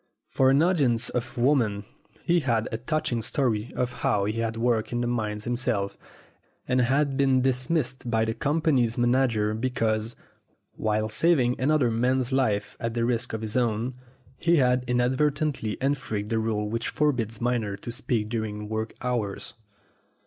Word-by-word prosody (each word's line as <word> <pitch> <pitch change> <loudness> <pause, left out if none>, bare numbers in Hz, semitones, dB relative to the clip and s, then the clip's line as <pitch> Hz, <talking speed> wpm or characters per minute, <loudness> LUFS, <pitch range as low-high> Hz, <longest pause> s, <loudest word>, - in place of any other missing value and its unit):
For 130 -1 +3
an 140 +4 +4
audience 135 -10 +2
of 125 0 -4
women 120 -6 +2 0.4
he 175 0 +3
had 115 -6 0
a 110 - -3
touching 145 -2 -1
story 110 -2 0
of 125 0 -1
how 100 -1 +2
he 110 +2 -2
had 115 0 -2
worked 115 +1 0
in 120 0 -1
the - - 0
mines 110 -3 -2
himself 115 -5 -1 0.7
and 125 0 +2
had 135 +2 +1
been 135 -2 +3
dismissed 130 -1 0
by 110 -1 +2
the 110 - -1
company's 140 -3 +1
manager 120 -3 +2
because, 115 -1 -1 0.6
while 110 0 0
saving 125 +1 +2
another 140 -3 +3
man's 125 +3 +1
life 110 -6 0
at 115 0 -3
the 115 -1 +1
risk 120 0 -1
of 110 - -3
his 110 -1 -5
own, 120 0 0 0.5
he 170 0 +3
had 125 -4 +3
inadvertently 130 0 0
infringed 125 -7 -2
the 115 - +2
rule 110 -1 -1
which 115 +2 -2
forbids 120 -7 0
miners 115 -5 -1
to 120 - -5
speak 115 -3 -1
during 105 -2 -4
work 110 +1 -3
hours. 120 -6 -2
120 Hz, 155 wpm, -26 LUFS, 110-130 Hz, 0.7 s, an